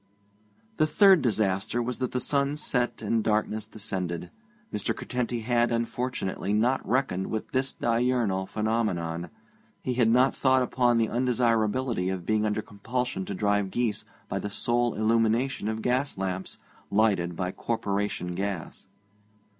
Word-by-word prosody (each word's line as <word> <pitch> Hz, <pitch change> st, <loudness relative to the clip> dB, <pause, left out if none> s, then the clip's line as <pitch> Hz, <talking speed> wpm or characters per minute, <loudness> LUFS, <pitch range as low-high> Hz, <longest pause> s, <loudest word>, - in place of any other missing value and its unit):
The 155 Hz, -, +3 dB
third 190 Hz, +2 st, +6 dB
disaster 105 Hz, -1 st, +1 dB
was 120 Hz, +1 st, -2 dB
that 130 Hz, -1 st, -1 dB
the 125 Hz, -, 0 dB
sun 140 Hz, +2 st, 0 dB
set 125 Hz, -6 st, 0 dB
and 110 Hz, +1 st, +1 dB
darkness 110 Hz, 0 st, 0 dB
descended. 95 Hz, -6 st, -4 dB, 0.4 s
Mr. 105 Hz, -, -1 dB
Curtenty 120 Hz, -1 st, -2 dB
had, 120 Hz, +1 st, +2 dB
unfortunately, 115 Hz, -4 st, -2 dB
not 120 Hz, +5 st, +2 dB
reckoned 105 Hz, -7 st, +1 dB
with 110 Hz, -, -4 dB
this 130 Hz, +1 st, 0 dB
diurnal 115 Hz, -5 st, +1 dB
phenomenon; 90 Hz, -7 st, -1 dB, 0.5 s
he 130 Hz, -, -1 dB
had 120 Hz, -2 st, +3 dB
not 125 Hz, +3 st, +4 dB
thought 130 Hz, -1 st, +3 dB
upon 120 Hz, -1 st, +2 dB
the 115 Hz, -1 st, +3 dB
undesirability 120 Hz, -3 st, +1 dB
of 95 Hz, -2 st, -4 dB
being 110 Hz, 0 st, +2 dB
under 105 Hz, 0 st, -1 dB
compulsion 110 Hz, 0 st, -3 dB
to 100 Hz, -, -4 dB
drive 100 Hz, 0 st, +1 dB
geese 115 Hz, +1 st, -1 dB, 0.2 s
by -, -, -2 dB
the 105 Hz, -, -4 dB
sole 120 Hz, +3 st, 0 dB
illumination 115 Hz, +2 st, +1 dB
of 110 Hz, 0 st, -3 dB
gas 130 Hz, +1 st, 0 dB
lamps 95 Hz, 0 st, -3 dB, 0.3 s
lighted 100 Hz, -5 st, +2 dB
by 90 Hz, +1 st, -2 dB
Corporation 100 Hz, -5 st, -2 dB
gas. 95 Hz, -3 st, -4 dB
110 Hz, 140 wpm, -27 LUFS, 100-125 Hz, 0.5 s, third